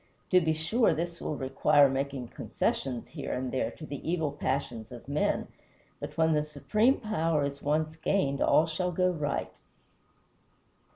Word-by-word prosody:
To 180 Hz, -1 st, +6 dB
be 160 Hz, -1 st, +2 dB
sure, 165 Hz, +5 st, +2 dB
this 170 Hz, +1 st, -4 dB
will 150 Hz, -, -2 dB
require 140 Hz, +2 st, +4 dB
making 135 Hz, -2 st, -3 dB
concession 125 Hz, -3 st, -2 dB
here 145 Hz, -3 st, -6 dB
and 125 Hz, 0 st, -2 dB
there 130 Hz, -, 0 dB
to 155 Hz, -, -10 dB
the 145 Hz, -1 st, -5 dB
evil 165 Hz, -4 st, 0 dB
passions 130 Hz, -5 st, -3 dB
of 120 Hz, 0 st, -10 dB
men, 145 Hz, +2 st, 0 dB, 0.5 s
but -, -, -7 dB
when 160 Hz, 0 st, +4 dB
the 150 Hz, -, +3 dB
supreme 150 Hz, -, +1 dB
power 165 Hz, -, 0 dB
is 140 Hz, 0 st, -5 dB
once 155 Hz, +2 st, 0 dB
gained 140 Hz, -5 st, 0 dB
all 155 Hz, -, +5 dB
shall 180 Hz, +2 st, -2 dB
go 180 Hz, +1 st, +2 dB
right. 150 Hz, -4 st, -2 dB
150 Hz, 160 wpm, -29 LUFS, 140-165 Hz, 0.5 s, To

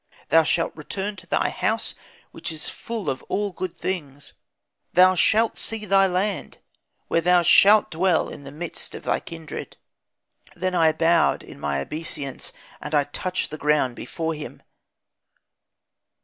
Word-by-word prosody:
Thou 165 Hz, -, +6 dB
shalt 165 Hz, +1 st, 0 dB
return 195 Hz, +6 st, -4 dB
to 185 Hz, -1 st, -13 dB
thy -, -, +1 dB
house -, -, -1 dB, 0.4 s
which -, -, -4 dB
is 155 Hz, -1 st, -2 dB
full 225 Hz, -6 st, -6 dB
of 135 Hz, -2 st, -1 dB
all 205 Hz, 0 st, -1 dB
good 180 Hz, -1 st, -5 dB
things, 145 Hz, -7 st, -4 dB, 0.6 s
thou 185 Hz, +1 st, +7 dB
shalt 220 Hz, +5 st, +3 dB
see 225 Hz, -1 st, -1 dB
thy 195 Hz, 0 st, +5 dB
land, 190 Hz, +1 st, -1 dB, 0.5 s
where 165 Hz, -, +2 dB
thou 180 Hz, 0 st, +4 dB
shalt 205 Hz, +5 st, +6 dB
dwell 175 Hz, +1 st, +2 dB
in 145 Hz, -, -9 dB
the 140 Hz, -, -9 dB
midst 160 Hz, +3 st, -5 dB
of -, -, -8 dB
thy -, -, 0 dB
kindred.' 165 Hz, -1 st, -8 dB, 0.8 s
"Then 185 Hz, +1 st, -2 dB
I 165 Hz, -3 st, +4 dB
bowed, 165 Hz, +1 st, +2 dB
in -, -, -12 dB
my 70 Hz, -1 st, -1 dB
obeisance, 150 Hz, -, -5 dB, 0.3 s
and 155 Hz, -, -3 dB
I 145 Hz, -, +4 dB
touched 180 Hz, +6 st, -3 dB
the 155 Hz, -, -6 dB
ground 150 Hz, -4 st, +2 dB
before 165 Hz, +4 st, -4 dB
him. 150 Hz, -1 st, -9 dB
165 Hz, 150 wpm, -24 LUFS, 150-185 Hz, 0.8 s, thou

